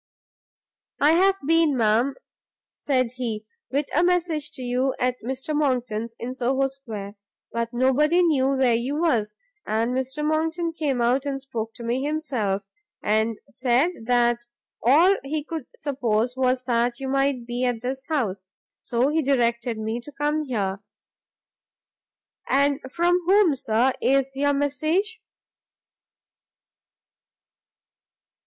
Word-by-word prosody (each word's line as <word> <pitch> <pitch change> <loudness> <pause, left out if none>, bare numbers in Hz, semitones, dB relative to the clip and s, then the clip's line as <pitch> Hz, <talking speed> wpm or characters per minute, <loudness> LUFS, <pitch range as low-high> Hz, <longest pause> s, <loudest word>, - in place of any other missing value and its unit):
"I 295 +2 +5
have 380 +4 +4
been, 325 -3 +3
madam," 230 +4 +2 0.6
said 255 -4 0
he, 220 -4 -3 0.2
"with 280 +3 0
a 340 - +4
message 335 -4 +1
to 260 - -7
you 250 +2 0
at 250 0 0
Mr 265 +5 -3
Monckton's, 240 -6 -1
in 250 +2 -5
Soho 265 +2 +1
Square: 220 -7 -8 0.3
but 235 0 -2
nobody 280 +8 +3
knew 285 -6 +3
where 260 -3 +3
you 245 +5 -1
was; 225 -11 +1 0.3
and 225 +3 0
Mr 265 +3 -2
Monckton 325 +2 0
came 285 -6 -1
out 255 +4 +2
and 275 -1 -2
spoke 225 -4 -5
to 240 - -9
me 240 +3 -1
himself, 255 -10 -1 0.4
and 220 +1 +1
said 255 +6 +2
that 240 -1 +3 0.4
all 330 - +5
he 295 +2 -3
could 315 -3 -6
suppose 250 -4 -1
was 255 -1 +1
that 240 0 0
you 270 - -4
might 270 -2 0
be 240 +1 -3
at 245 -2 -1
this 265 +1 -3
house. 200 - -2 0.3
So 245 +3 0
he 320 +2 +1
directed 235 -4 +1
me 220 +2 -3
to 295 - -11
come 295 +2 -1
here." 200 -7 -2 1.7
"And 280 +1 +3
from 350 +3 +2
whom, 385 -5 +5
Sir, 245 +1 +1
is 270 0 +2
your 285 +1 +2
message?" 310 +10 0
265 Hz, 130 wpm, -24 LUFS, 235-295 Hz, 1.7 s, I